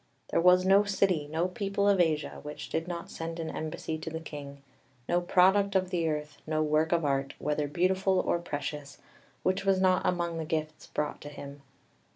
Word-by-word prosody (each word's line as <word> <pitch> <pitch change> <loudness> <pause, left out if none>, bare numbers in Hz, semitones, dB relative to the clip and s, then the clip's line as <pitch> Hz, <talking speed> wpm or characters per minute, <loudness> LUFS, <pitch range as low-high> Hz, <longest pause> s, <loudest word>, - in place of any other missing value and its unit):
"There - - +3
was 180 +1 +6
no 195 +2 +6
city, 195 -6 +1
no 165 +3 0
people 200 +2 -1
of 200 -2 +4
Asia, 155 -3 +1
which 150 0 -7
did 160 +1 -2
not 170 -1 -5
send 165 +1 -5
an 160 -1 -3
embassy 155 0 -4
to 160 - -5
the 160 0 -4
king; 140 -3 -9 0.4
no 175 0 +2
product 190 +3 +4
of 185 -1 +1
the 170 -2 +1
earth, 150 -1 -4
no 155 0 +1
work 155 +1 +2
of 170 -2 +2
art, 135 -1 0
whether 150 0 -1
beautiful 185 +4 +2
or 170 - +1
precious, 145 -3 -5 0.5
which 185 +1 +1
was 195 -1 +3
not 185 0 +3
among 170 -2 0
the - - -2
gifts 155 -1 -3
brought 150 0 -3
to 145 - -7
him. 140 -1 -9
165 Hz, 195 wpm, -29 LUFS, 150-185 Hz, 0.5 s, was